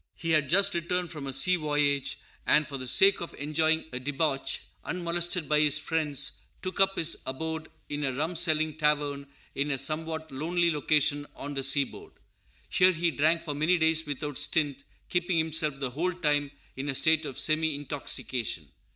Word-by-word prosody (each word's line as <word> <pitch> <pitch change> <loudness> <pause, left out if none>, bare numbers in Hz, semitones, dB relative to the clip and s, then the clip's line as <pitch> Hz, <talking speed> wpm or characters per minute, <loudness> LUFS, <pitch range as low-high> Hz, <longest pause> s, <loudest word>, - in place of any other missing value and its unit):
He 165 - -3
had 150 -4 +3
just 195 +5 +4
returned 175 0 -1
from 145 -4 -6
a - - -2
sea 135 +8 +2
voyage; 145 -3 0 0.3
and, 150 +1 +5
for 140 - -5
the 130 -1 -4
sake 195 +10 +5
of 170 - -6
enjoying 155 +2 +1
a 125 - -3
debauch, 135 0 -1 0.2
unmolested 175 -1 -1
by 150 0 +3
his 150 -1 +3
friends, 155 -3 -1 0.3
took 185 +1 -4
up 195 0 +4
his 165 0 +1
abode 160 +4 -4 0.2
in 145 0 -3
a 135 - +1
rum 155 +7 -2
selling 155 -2 +2
tavern 145 -2 0 0.3
in 140 +2 -1
a 140 - 0
somewhat 160 +3 -2
lonely 170 +5 +1
location 150 -1 +1
on 145 +1 -6
the 135 - -1
seaboard. 135 0 -1 0.5
Here 185 0 +4
he 170 0 +1
drank 160 +3 +2
for 150 -3 -3
many 155 +5 +2
days 160 -1 +2
without 145 -1 -3
stint, 145 -4 +1 0.2
keeping 180 0 0
himself 160 -3 0
the 135 -2 -2
whole 175 +7 -1
time 145 -4 +1 0.3
in 135 +2 -4
a 135 - -1
state 160 +1 +3
of 135 - -7
semi 155 -1 +1
intoxication. 130 - -3
155 Hz, 175 wpm, -28 LUFS, 140-165 Hz, 0.5 s, and